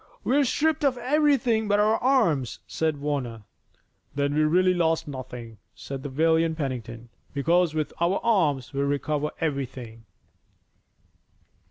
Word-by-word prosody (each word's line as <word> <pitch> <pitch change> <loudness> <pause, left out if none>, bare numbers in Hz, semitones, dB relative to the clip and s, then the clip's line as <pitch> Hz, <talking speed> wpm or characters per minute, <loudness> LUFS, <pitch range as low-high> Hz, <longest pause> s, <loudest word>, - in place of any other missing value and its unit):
"We're 280 +2 +3
stripped 315 +5 +1
of 270 -3 +2
everything 250 -4 +2
but 205 0 +2
our 215 +1 +3
arms," 210 - +2
said 160 -2 -1
Warner. 135 -6 -3 0.7
"Then 140 0 0
we've 155 +1 +2
really 185 +1 +4
lost 165 -3 +1
nothing," 125 -5 -8 0.2
said 130 +4 -7
the 145 - -5
valiant 160 +3 +2
Pennington, 120 -5 -5 0.3
"because 165 +3 +2
with 155 -2 -2
our 175 +3 +2
arms 150 - +1
we'll 140 0 0
recover 145 +1 -1
everything." 130 -7 -4
155 Hz, 130 wpm, -25 LUFS, 135-205 Hz, 0.7 s, really